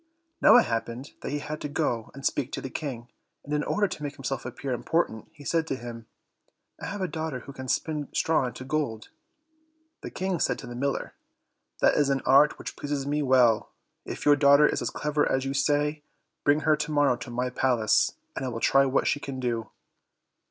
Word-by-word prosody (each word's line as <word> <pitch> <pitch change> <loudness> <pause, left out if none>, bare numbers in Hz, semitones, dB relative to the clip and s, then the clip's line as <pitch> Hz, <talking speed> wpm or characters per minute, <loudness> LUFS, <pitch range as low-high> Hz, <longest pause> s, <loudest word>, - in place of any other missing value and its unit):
Now - - +8
it 245 - +5
happened 115 +4 -3
that - - -4
he 145 - -1
had 150 +1 -6
to 145 - -4
go 125 -7 -1
and 140 - -8
speak 140 -1 0
to - - -2
the 135 - -6
King, 125 -6 -5 0.4
and 145 - -5
in 150 0 +1
order 205 0 +1
to 165 - -7
make 145 -1 -4
himself 135 -2 -4
appear 130 +2 -4
important 125 -3 -1
he 145 -3 -15
said 165 +1 +1
to 135 - -1
him, 115 -2 -8 0.7
"I - - -4
have 205 0 -5
a 185 - 0
daughter 160 -6 -4
who 140 - -10
can 130 -1 -8
spin 150 +2 -1
straw 160 -5 +1
into 125 - -7
gold." 135 -6 -2 0.9
The - - -6
King 185 -2 -2
said - - +1
to - - -9
the 120 - -7
miller, 135 +3 -2 0.7
"That - - +5
is 145 -2 +2
an 135 -1 0
art 140 +3 +5
which - - -7
pleases 145 -2 -3
me 145 +1 0
well; 125 -5 +4 0.3
if - - -6
your 145 0 +7
daughter 140 +1 +6
is - - +1
as - - -1
clever 150 0 0
as 130 0 +1
you 135 - -2
say, 145 +2 +1 0.4
bring 145 +2 +3
her 155 -1 +4
to 155 +1 -3
morrow 145 -3 +3
to - - -8
my 125 +1 -2
palace, 125 -4 +2 0.2
and - - -3
I - - -2
will 115 -2 -4
try 135 +3 +4
what 130 - +1
she 145 - +1
can 135 -2 -6
do." 115 -4 -2
140 Hz, 215 wpm, -27 LUFS, 125-150 Hz, 0.9 s, Now